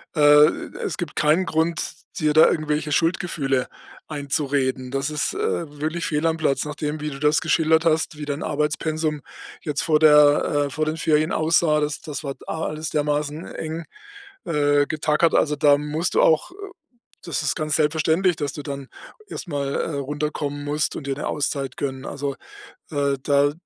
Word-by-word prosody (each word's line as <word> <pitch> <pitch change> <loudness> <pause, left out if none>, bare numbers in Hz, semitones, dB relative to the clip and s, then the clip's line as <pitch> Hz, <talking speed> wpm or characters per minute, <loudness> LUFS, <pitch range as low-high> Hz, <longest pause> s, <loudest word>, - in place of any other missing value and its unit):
äh, - - -2 0.3
e - - -2
es - - -3
gibt 175 -5 -5
keinen 155 +5 +2
Grund, 165 +1 0 0.3
dir 150 -1 +2
da 155 - +7
irgendwelche 150 -1 -1
Schuldgefühle 155 -5 0 0.4
einzureden. 140 -3 -1
Das 135 +2 -1
ist, 150 - -2
äh, - - -6 0.4
wirklich 160 +2 -2
fehl 150 +1 -1
am 165 0 0
Platz, 155 -3 0
nachdem, 150 +1 -4
wie 150 - -2
du 135 - -8
das 150 +1 +3
geschildert 160 0 +3
hast, 160 0 +1
wie 150 - -5
dein 145 +1 -3
Arbeitspensum 150 0 -1 0.4
jetzt 150 -2 -1
vor 155 -2 +3
der 150 -1 +5
äh, - - -7
vor 155 +3 -2
den 155 +1 -2
Ferien 155 0 +2
aussah. 160 -1 +3
Das 150 -1 -2
das 150 0 -6
war 135 -1 -4
a 160 - -3
alles 155 +1 -4
dermaßen 150 +1 -2
eng, 160 +1 -5 0.6
äh, 145 -2 +2
getackert. 155 +1 +1
Also, 150 -1 +2
da 145 -1 +5
musst 150 +4 -2
du - - +5
auch 160 - +3
äh, - - -16 0.7
das 170 - -2
ist 150 - 0
ganz 155 -1 -1
selbstverständlich, 160 +4 +2
dass 145 -2 -3
du 145 - -6
dann 140 -2 -6 0.4
erstmal, 140 -5 -4
äh, - - -1
runterkommen 145 +1 -3
musst 150 +1 -1
und 140 - -6
dir 135 - -1
'ne 145 - -4
Auszeit 140 -3 -2
gönnen. 135 -1 -4
Also, 140 -1 -4 0.6
äh, 140 -2 0
da 145 0 +3
150 Hz, 175 wpm, -23 LUFS, 145-155 Hz, 0.7 s, da